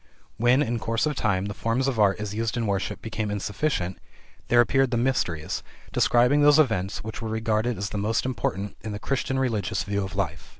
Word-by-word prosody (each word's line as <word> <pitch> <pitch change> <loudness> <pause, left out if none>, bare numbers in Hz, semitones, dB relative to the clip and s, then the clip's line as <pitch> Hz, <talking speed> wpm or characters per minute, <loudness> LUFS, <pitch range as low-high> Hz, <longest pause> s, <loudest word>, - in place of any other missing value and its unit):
When, 125 +5 +4
in 120 -2 -2
course 115 +4 0
of 150 -1 -1
time, 100 -5 0
the 100 - -4
forms 115 +6 0
of 125 -5 -1
art 100 -1 +4
as 105 -1 -4
used 115 +2 -2
in 115 - 0
worship 100 -2 -2
became 110 -1 -3
insufficient, 100 -1 -2 0.5
there 120 - +4
appeared 135 +3 +4
the 120 - 0
Mysteries, 115 -11 -1 0.3
describing 125 +5 +4
those 145 0 +7
events 110 -10 +1
which 110 +2 -6
were 110 - -3
regarded 110 +1 0
as 100 +1 -3
the 105 - -2
most 110 +4 0
important 105 -5 -2
in 110 -1 -5
the 105 - -5
Christian 130 +2 -1
religious 115 -7 0
view 100 0 -1
of 95 -1 -6
life. 85 -5 -3
110 Hz, 205 wpm, -25 LUFS, 100-125 Hz, 0.5 s, those